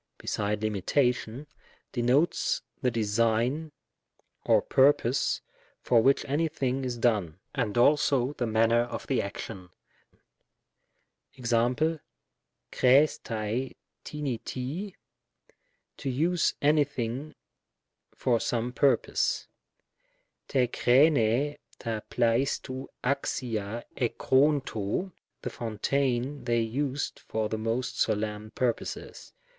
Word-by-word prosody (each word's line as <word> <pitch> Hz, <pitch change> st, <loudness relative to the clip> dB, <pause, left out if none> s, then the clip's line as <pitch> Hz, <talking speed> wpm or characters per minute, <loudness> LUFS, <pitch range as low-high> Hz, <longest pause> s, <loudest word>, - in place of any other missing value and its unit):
beside 105 Hz, 0 st, -2 dB
limitation, 120 Hz, +4 st, 0 dB, 0.5 s
denotes 130 Hz, +7 st, +1 dB, 0.2 s
the 130 Hz, -, +2 dB
design 115 Hz, +7 st, 0 dB, 0.7 s
or -, -, +4 dB
purpose 135 Hz, -2 st, +2 dB, 0.4 s
for 115 Hz, -2 st, +4 dB
which 135 Hz, +4 st, +3 dB
any 150 Hz, +4 st, +1 dB
thing 135 Hz, -3 st, -2 dB
is 125 Hz, -2 st, -3 dB
done, 105 Hz, -9 st, +1 dB, 0.2 s
and 105 Hz, +1 st, -1 dB
also 140 Hz, 0 st, +3 dB
the 120 Hz, -, 0 dB
manner 115 Hz, +1 st, +3 dB
of 120 Hz, 0 st, -5 dB
the 135 Hz, -, +1 dB
action. 100 Hz, -2 st, -7 dB, 1.7 s
Ex.^ 125 Hz, +6 st, +1 dB, 0.7 s
xQr]6&ac 125 Hz, -3 st, +2 dB, 0.3 s
tcpI 140 Hz, -6 st, -4 dB, 0.4 s
Tiy 200 Hz, -2 st, -9 dB, 1.0 s
"to 135 Hz, -, -3 dB
use 165 Hz, +7 st, +1 dB
any 150 Hz, +1 st, +5 dB
thing 135 Hz, +1 st, -5 dB, 0.8 s
for 120 Hz, -3 st, +1 dB
some 120 Hz, +1 st, -1 dB
purpose; 135 Hz, -3 st, +1 dB, 0.5 s
" -, -, -23 dB
r?J 125 Hz, -2 st, +4 dB
^^^vrj -, -, -9 dB, 1.0 s
Tcc 110 Hz, -2 st, -4 dB
nXtioTOv 130 Hz, +2 st, 0 dB, 0.2 s
d^ca 120 Hz, -5 st, -2 dB, 0.8 s
ej^qcSvrOy 110 Hz, -, -3 dB
" -, -, -55 dB
the -, -, -2 dB
fountain 125 Hz, +4 st, -1 dB
they 120 Hz, -1 st, +2 dB
used 135 Hz, +5 st, -2 dB
for 110 Hz, -1 st, -3 dB
the 110 Hz, -, -2 dB
most 115 Hz, +3 st, -2 dB
solemn 105 Hz, 0 st, -1 dB
purposes." 125 Hz, -2 st, -3 dB
120 Hz, 95 wpm, -28 LUFS, 115-140 Hz, 1.7 s, any